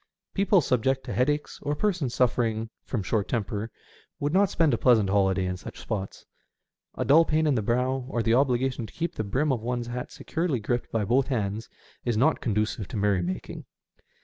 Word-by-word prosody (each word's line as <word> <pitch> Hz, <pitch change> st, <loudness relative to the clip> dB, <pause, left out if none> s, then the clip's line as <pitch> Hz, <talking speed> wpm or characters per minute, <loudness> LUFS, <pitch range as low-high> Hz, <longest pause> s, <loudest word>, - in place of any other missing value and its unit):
People 195 Hz, -1 st, +4 dB
subject 130 Hz, 0 st, +1 dB
to -, -, -5 dB
headaches, 145 Hz, +4 st, 0 dB
or 145 Hz, -, -1 dB
persons 175 Hz, -, -1 dB
suffering 115 Hz, -3 st, +1 dB
from 115 Hz, -6 st, -3 dB
short 100 Hz, +1 st, 0 dB
temper, 110 Hz, -1 st, -2 dB, 0.5 s
would 145 Hz, +2 st, -1 dB
not 195 Hz, +1 st, +4 dB
spend 160 Hz, -5 st, +2 dB
a -, -, +2 dB
pleasant 110 Hz, -6 st, +4 dB
holiday 95 Hz, -2 st, +2 dB
in 90 Hz, 0 st, -2 dB
such -, -, -9 dB
spots. 100 Hz, -4 st, -5 dB, 0.7 s
A -, -, -2 dB
dull 155 Hz, +4 st, +7 dB
pain 160 Hz, 0 st, +1 dB
in 150 Hz, -, +3 dB
the 115 Hz, -, +1 dB
brow, 125 Hz, +4 st, 0 dB
or 120 Hz, -4 st, -1 dB
the 115 Hz, -, +2 dB
obligation 125 Hz, -2 st, +1 dB
to -, -, -16 dB
keep 170 Hz, +1 st, -3 dB
the 110 Hz, -, -3 dB
brim 135 Hz, +9 st, 0 dB
of 125 Hz, -4 st, -1 dB
one's 120 Hz, +1 st, -2 dB
hat 120 Hz, +1 st, -5 dB
securely 160 Hz, -6 st, -2 dB
gripped 120 Hz, +3 st, -2 dB
by 110 Hz, -2 st, 0 dB
both 130 Hz, +5 st, +2 dB
hands, 110 Hz, -4 st, -2 dB, 0.3 s
is 120 Hz, -3 st, 0 dB
not 155 Hz, +7 st, +3 dB
conducive 105 Hz, -2 st, -1 dB
to 120 Hz, -, -5 dB
merry 100 Hz, -2 st, +2 dB
making. 90 Hz, +2 st, -5 dB
120 Hz, 195 wpm, -27 LUFS, 110-140 Hz, 0.7 s, dull